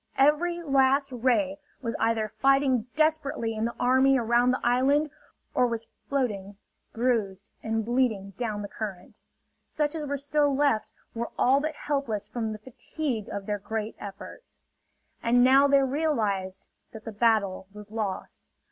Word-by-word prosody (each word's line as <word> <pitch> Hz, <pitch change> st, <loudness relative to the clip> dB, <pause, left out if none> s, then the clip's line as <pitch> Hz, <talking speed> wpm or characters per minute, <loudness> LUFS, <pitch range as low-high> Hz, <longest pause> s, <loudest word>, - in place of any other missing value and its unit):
Every 340 Hz, +5 st, +3 dB
last 275 Hz, -1 st, +3 dB
ray 265 Hz, +4 st, +1 dB, 0.2 s
was 230 Hz, -2 st, -2 dB
either 225 Hz, -1 st, +1 dB
fighting 270 Hz, -2 st, +3 dB
desperately 310 Hz, -7 st, +1 dB
in 220 Hz, 0 st, -2 dB
the 235 Hz, -, -3 dB
army 260 Hz, +2 st, +4 dB
around 240 Hz, +1 st, +3 dB
the 255 Hz, -, +1 dB
island, 275 Hz, +5 st, +2 dB, 0.4 s
or 250 Hz, -, +3 dB
was 230 Hz, -1 st, -4 dB, 0.2 s
floating 205 Hz, -8 st, -2 dB, 0.3 s
bruised 215 Hz, -5 st, -1 dB
and 225 Hz, -1 st, -1 dB
bleeding 230 Hz, -5 st, 0 dB
down 210 Hz, -1 st, -4 dB
the -, -, -4 dB
current. 195 Hz, -4 st, -7 dB, 0.4 s
Such 300 Hz, -1 st, -2 dB
as 310 Hz, -2 st, -4 dB
were 285 Hz, 0 st, -1 dB
still 285 Hz, 0 st, +1 dB
left 245 Hz, -7 st, +1 dB, 0.2 s
were 235 Hz, +1 st, -3 dB
all 265 Hz, +3 st, +4 dB
but 310 Hz, +1 st, -3 dB
helpless 275 Hz, -8 st, -2 dB
from 225 Hz, -3 st, -3 dB
the 215 Hz, -, -5 dB
fatigue 245 Hz, +1 st, -5 dB
of 200 Hz, -1 st, -5 dB
their 205 Hz, 0 st, -2 dB
great 220 Hz, +2 st, -4 dB
efforts. 200 Hz, -, -11 dB, 0.6 s
And 245 Hz, +1 st, +4 dB
now 270 Hz, +2 st, +6 dB
they 280 Hz, -1 st, +4 dB
realized 225 Hz, -10 st, -1 dB, 0.2 s
that 220 Hz, -1 st, -10 dB
the 225 Hz, -, -5 dB
battle 210 Hz, -4 st, +1 dB
was 210 Hz, 0 st, -12 dB
lost. 210 Hz, -4 st, -5 dB
245 Hz, 150 wpm, -27 LUFS, 215-275 Hz, 0.6 s, now